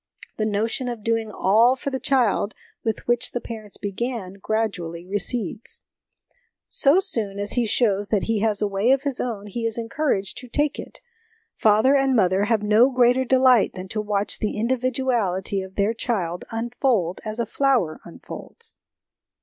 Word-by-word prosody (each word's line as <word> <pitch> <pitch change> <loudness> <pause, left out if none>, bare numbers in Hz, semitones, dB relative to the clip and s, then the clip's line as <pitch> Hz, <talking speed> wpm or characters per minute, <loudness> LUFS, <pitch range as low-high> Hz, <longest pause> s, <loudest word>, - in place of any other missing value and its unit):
The 215 - 0
notion 220 +5 -1
of 235 -3 -6
doing 225 -1 0
all 225 +6 +4
for 275 +1 -4
the 265 - -2
child 235 -6 +1 0.3
with 225 -2 -3
which 240 +1 +1
the 245 - -1
parents 220 -4 -8
began 205 -1 -4
gradually 180 -7 -2
recedes. 210 +3 -2 0.8
So 290 +6 +4
soon 225 - -2
as 205 0 -2
he 240 -2 +1
shows 205 -3 +1
that 205 -2 +1
he 225 -2 0
has 210 -1 +1
a - - +2
way 200 +4 0
of 270 0 0
his 280 -3 -1
own 220 -5 -4
he 220 +3 -5
is 230 0 -1
encouraged 230 -4 -1
to 250 - -11
take 295 +4 0
it. - - -9 0.5
Father 220 +6 +4
and 270 -1 +3
mother 190 -2 +3
have 215 -1 +1
no 215 +5 +5
greater 250 0 +3
delight 255 -3 +4
than 185 0 -6
to 215 - -2
watch 205 -1 -2
the 210 - -2
individuality 235 -5 0
of 190 0 -10
their 205 +2 +1
child 185 -7 -2
unfold 230 - 0
as 215 -1 -5
a 235 - 0
flower 240 - +1
unfolds. 455 - -8
225 Hz, 165 wpm, -23 LUFS, 200-250 Hz, 0.8 s, no